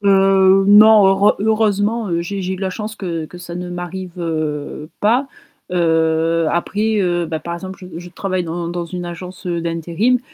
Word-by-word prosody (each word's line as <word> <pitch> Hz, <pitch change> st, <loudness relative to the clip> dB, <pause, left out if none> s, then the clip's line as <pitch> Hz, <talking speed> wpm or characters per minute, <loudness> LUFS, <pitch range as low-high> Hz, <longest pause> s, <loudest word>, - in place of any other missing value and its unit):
Heu, 195 Hz, -1 st, +4 dB
non, 210 Hz, 0 st, +8 dB
heureu 195 Hz, +2 st, +4 dB
heureureusement, 210 Hz, -3 st, +1 dB
j'ai 195 Hz, +3 st, -4 dB
j'ai 185 Hz, +1 st, -2 dB
eu -, -, -7 dB
de -, -, -11 dB
la 190 Hz, -1 st, -1 dB
chance 210 Hz, +2 st, -6 dB
que 170 Hz, -4 st, -4 dB
que 180 Hz, -, -12 dB
ça 175 Hz, -1 st, -8 dB
ne 180 Hz, 0 st, -5 dB
m'arrive, 175 Hz, +1 st, -6 dB
heu, 155 Hz, -2 st, -3 dB
pas, 245 Hz, +6 st, +2 dB, 0.4 s
heu, 165 Hz, -1 st, +1 dB
après, 210 Hz, +5 st, 0 dB
heu, 175 Hz, -2 st, 0 dB
bah, 160 Hz, -1 st, -3 dB
par 170 Hz, +2 st, -5 dB
exemple, 190 Hz, +2 st, -8 dB
je 185 Hz, -, -11 dB
je 175 Hz, -, -9 dB
travaille 185 Hz, -1 st, -2 dB
dans 170 Hz, +1 st, -4 dB
dans 175 Hz, 0 st, -3 dB
une 175 Hz, +1 st, -6 dB
agence, 180 Hz, +2 st, -8 dB
heu, 170 Hz, -1 st, -1 dB
d'intérim, 170 Hz, +9 st, 0 dB
180 Hz, 185 wpm, -18 LUFS, 170-200 Hz, 0.4 s, non